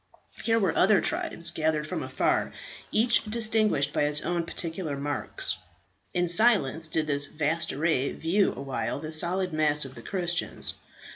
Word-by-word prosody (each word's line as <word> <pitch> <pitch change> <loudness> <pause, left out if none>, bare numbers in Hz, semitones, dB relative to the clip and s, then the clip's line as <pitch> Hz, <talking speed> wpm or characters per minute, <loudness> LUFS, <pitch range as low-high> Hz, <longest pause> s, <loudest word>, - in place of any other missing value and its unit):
Here 225 0 +2
were 190 -7 +1
other 195 +1 +5
tribes, 315 - -1
gathered 155 -2 0
from - - -4
afar, - - 0 0.4
each 235 +2 +3
distinguished 215 -9 +1
by - - +1
its 145 0 +1
own 170 -1 -1
particular 165 -4 -4
marks. 140 -5 -2 0.6
In 175 0 +1
silence 170 - +3
did 160 0 0
this 145 -1 +2
vast 155 +3 -1
array 145 -2 0
view 190 +5 +1
awhile 135 -3 -3
the 155 +1 -6
solid 180 +3 +1
mass 150 -2 +3
of 135 - -8
the - - -11
Christians. 175 -3 -2
165 Hz, 150 wpm, -27 LUFS, 145-190 Hz, 0.6 s, other